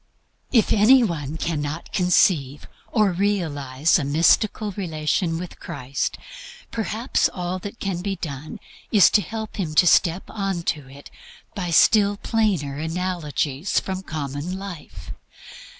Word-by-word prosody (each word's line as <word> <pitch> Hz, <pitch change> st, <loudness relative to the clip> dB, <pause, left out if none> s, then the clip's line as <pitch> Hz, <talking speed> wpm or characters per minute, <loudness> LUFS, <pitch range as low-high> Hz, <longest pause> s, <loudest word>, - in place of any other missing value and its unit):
If 230 Hz, -5 st, +3 dB
any 240 Hz, +5 st, +6 dB
one 160 Hz, -7 st, -3 dB
cannot 155 Hz, -1 st, -4 dB
conceive 165 Hz, -6 st, +2 dB, 0.2 s
or 215 Hz, -4 st, +3 dB
realize 165 Hz, -7 st, 0 dB
a -, -, -2 dB
mystical 170 Hz, +8 st, +2 dB
relation 165 Hz, -2 st, -1 dB
with 175 Hz, +1 st, -8 dB
Christ, 135 Hz, -5 st, -4 dB, 0.5 s
perhaps 225 Hz, +2 st, 0 dB
all 180 Hz, 0 st, -4 dB
that 205 Hz, +5 st, -8 dB
can 190 Hz, -3 st, -3 dB
be 195 Hz, +1 st, -2 dB
done 150 Hz, -4 st, -7 dB, 0.3 s
is 205 Hz, -4 st, +6 dB
to 210 Hz, -, +4 dB
help 220 Hz, +5 st, -6 dB
him 165 Hz, -6 st, -3 dB
to 180 Hz, -, +6 dB
step 175 Hz, +1 st, +3 dB
on 195 Hz, -5 st, -3 dB
to 145 Hz, -5 st, -3 dB
it 140 Hz, +1 st, -13 dB, 0.4 s
by 180 Hz, -5 st, -4 dB
still 200 Hz, +4 st, +4 dB
plainer 195 Hz, -13 st, 0 dB
analogies 160 Hz, -2 st, -1 dB
from 190 Hz, 0 st, -5 dB
common 155 Hz, +1 st, -5 dB
life. 175 Hz, -, -9 dB
175 Hz, 130 wpm, -23 LUFS, 150-200 Hz, 0.5 s, any